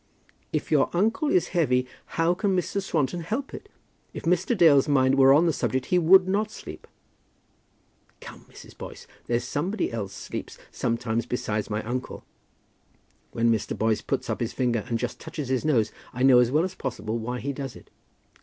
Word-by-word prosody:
"If -, -, -3 dB
your -, -, +3 dB
uncle 225 Hz, -, +1 dB
is 180 Hz, -, +2 dB
heavy, 130 Hz, -8 st, +2 dB, 0.3 s
how 165 Hz, +1 st, +3 dB
can 195 Hz, +1 st, 0 dB
Mr. 200 Hz, +2 st, -1 dB
Swanton 165 Hz, -3 st, -1 dB
help 225 Hz, +12 st, -4 dB
it? -, -, -9 dB, 0.5 s
If -, -, -6 dB
Mr. 180 Hz, +7 st, +1 dB
Dale's 150 Hz, -6 st, +6 dB
mind 130 Hz, -2 st, +3 dB
were 135 Hz, 0 st, +6 dB
on 150 Hz, +5 st, +5 dB
the 165 Hz, -, +2 dB
subject 130 Hz, -2 st, -1 dB
he 180 Hz, -, +5 dB
would 185 Hz, +3 st, +6 dB
not 205 Hz, +3 st, 0 dB
sleep." -, -, -10 dB, 1.3 s
"Come, -, -, -12 dB
Mrs. -, -, -14 dB
Boyce; -, -, -9 dB, 0.2 s
there's 120 Hz, 0 st, 0 dB
somebody 150 Hz, -, -2 dB
else 100 Hz, -4 st, -4 dB
sleeps -, -, -7 dB
sometimes 115 Hz, -1 st, -2 dB
besides 110 Hz, -4 st, -2 dB
my 105 Hz, +1 st, -2 dB
uncle. 125 Hz, +3 st, -5 dB, 1.1 s
When 115 Hz, 0 st, +2 dB
Mr. 110 Hz, -2 st, -1 dB
Boyce 110 Hz, -1 st, +1 dB
puts -, -, -2 dB
up -, -, -2 dB
his -, -, -2 dB
finger 120 Hz, -4 st, 0 dB
and 115 Hz, -, -1 dB
just 125 Hz, +1 st, -4 dB
touches 145 Hz, -5 st, -6 dB
his 130 Hz, -1 st, 0 dB
nose, 120 Hz, -9 st, +2 dB, 0.2 s
I 125 Hz, -, -2 dB
know 130 Hz, -2 st, +7 dB
as 120 Hz, -1 st, +4 dB
well 150 Hz, +5 st, +2 dB
as 185 Hz, 0 st, -3 dB
possible 120 Hz, -7 st, -4 dB
why 125 Hz, +2 st, -4 dB
he 140 Hz, +2 st, -3 dB
does 135 Hz, -2 st, -6 dB
it." -, -, -15 dB
135 Hz, 180 wpm, -26 LUFS, 120-175 Hz, 1.3 s, know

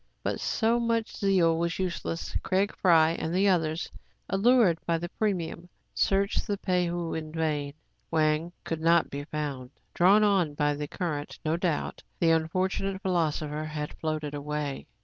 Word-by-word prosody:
But -, -, -1 dB
so 230 Hz, +1 st, +1 dB
much 230 Hz, -1 st, -1 dB
zeal 180 Hz, -5 st, +3 dB
was 170 Hz, 0 st, -1 dB
useless. 175 Hz, -2 st, -3 dB
Fry 190 Hz, +1 st, +2 dB
Craig 165 Hz, -5 st, +3 dB
and 160 Hz, -, -2 dB
the 195 Hz, +2 st, +3 dB
others, 165 Hz, -3 st, +1 dB, 0.4 s
allured 200 Hz, -4 st, +4 dB
by 170 Hz, -1 st, +2 dB
the 175 Hz, +1 st, -5 dB
premium, 180 Hz, -4 st, -2 dB, 0.2 s
searched 200 Hz, +3 st, +1 dB
the 205 Hz, -2 st, -1 dB
Pei 180 Hz, -2 st, +1 dB
ho 170 Hz, -1 st, -3 dB
in 155 Hz, -1 st, -4 dB
vain. 150 Hz, -3 st, -2 dB, 0.3 s
Wang 155 Hz, +1 st, +1 dB
could 160 Hz, -1 st, -4 dB
not 170 Hz, 0 st, +3 dB
be 145 Hz, +1 st, -5 dB
found. 145 Hz, -5 st, -4 dB, 0.2 s
Drawn 195 Hz, +5 st, +5 dB
on 190 Hz, -8 st, +2 dB
by 145 Hz, 0 st, +1 dB
the 145 Hz, 0 st, -4 dB
current, 150 Hz, -4 st, -4 dB
no 155 Hz, +1 st, +2 dB
doubt, 170 Hz, -3 st, -2 dB, 0.2 s
the 165 Hz, -1 st, +4 dB
unfortunate 185 Hz, +4 st, 0 dB
phil 190 Hz, -, 0 dB
osopher 155 Hz, -2 st, -1 dB
had 150 Hz, -1 st, -4 dB
floated 155 Hz, -2 st, -2 dB
away. 145 Hz, -1 st, -4 dB
165 Hz, 160 wpm, -28 LUFS, 155-190 Hz, 0.4 s, Drawn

